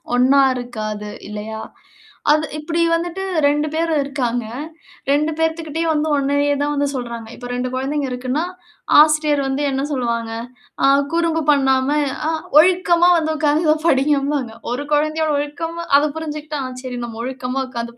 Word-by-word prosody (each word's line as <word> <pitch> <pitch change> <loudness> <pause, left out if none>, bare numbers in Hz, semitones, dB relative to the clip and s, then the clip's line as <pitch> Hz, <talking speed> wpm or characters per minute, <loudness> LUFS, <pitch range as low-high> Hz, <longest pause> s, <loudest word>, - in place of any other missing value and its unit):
ஒண்ணா 265 +3 +5
இருக்காது. 215 -4 -5 0.2
இல்லயா? 215 +1 -6 0.7
அது 305 +1 +3
இப்பிடி 330 +2 -2
வந்துட்டு 345 +3 -2 0.2
2 295 +1 +2
பேர் 330 +1 0
இருக்காங்க. 245 -4 -2 0.7
2 300 +2 +2
பேத்துக்கிட்டயும் 320 0 -1
வந்து 305 +1 0
ஒண்ணயே 285 +1 +1
தான் 290 0 0
வந்து 285 0 +1
சொல்றாங்க. 235 -3 -5
இப்ப 245 - -8
2 250 +1 -2
குழந்தைங்க 275 +2 -1
இருக்குன்னா, 255 +5 -2 0.6
ஆசிரியர் 305 -1 +4
வந்து 270 +1 -1
என்ன 270 0 -1
சொல்லுவாங்க? 235 -4 -1 0.5
"அ - - +6 0.3
குறும்பு 335 -1 +1
பண்ணாம 265 -1 +2 0.4
அ - - +1 0.3
ஒழுக்கமா 350 0 +4
வந்து 315 -1 0
உட்காந்து 305 +1 +3
படிங்க" 280 0 +3
அப்பிடின்பாங்க 275 -5 -2 0.2
ஒரு 285 +4 -4
குழந்தைய 310 +2 +1
ஒழுக்கமா, 325 +4 -4
அத 290 - +3
புரிஞ்சுகிட்டா 305 -1 -5 0.2
"சரி 250 -1 -5
நம்ம 230 -1 -8
ஒழுக்கமா 255 +1 -3
உட்கார்ந்து 235 -1 -5
எதோ - - -30
285 Hz, 145 wpm, -20 LUFS, 250-310 Hz, 0.7 s, அ